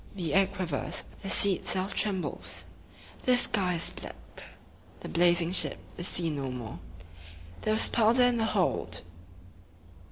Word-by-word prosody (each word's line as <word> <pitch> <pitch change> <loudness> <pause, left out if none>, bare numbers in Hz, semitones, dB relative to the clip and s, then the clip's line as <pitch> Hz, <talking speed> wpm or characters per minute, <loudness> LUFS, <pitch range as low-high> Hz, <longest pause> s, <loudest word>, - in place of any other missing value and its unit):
The 170 -6 -4
air 195 0 +3
quivers; 180 -7 -4 0.2
the 195 - -6
sea 200 0 +4
itself 185 +2 0
trembles; 195 -4 -3 0.6
the 250 -1 +4
sky 190 -7 +2
is 165 - 0
black. - - -10 0.9
The - - -8
blazing 175 0 +3
ship 185 - +2 0.2
is 175 - -2
seen 165 -4 +4
no 135 -1 -4
more. 120 -6 -8 0.8
There 215 - -1
was - - +6
powder 235 +2 +3
in 245 -1 +2
the 225 - 0
hold! 200 -5 -2
185 Hz, 140 wpm, -28 LUFS, 170-210 Hz, 0.9 s, was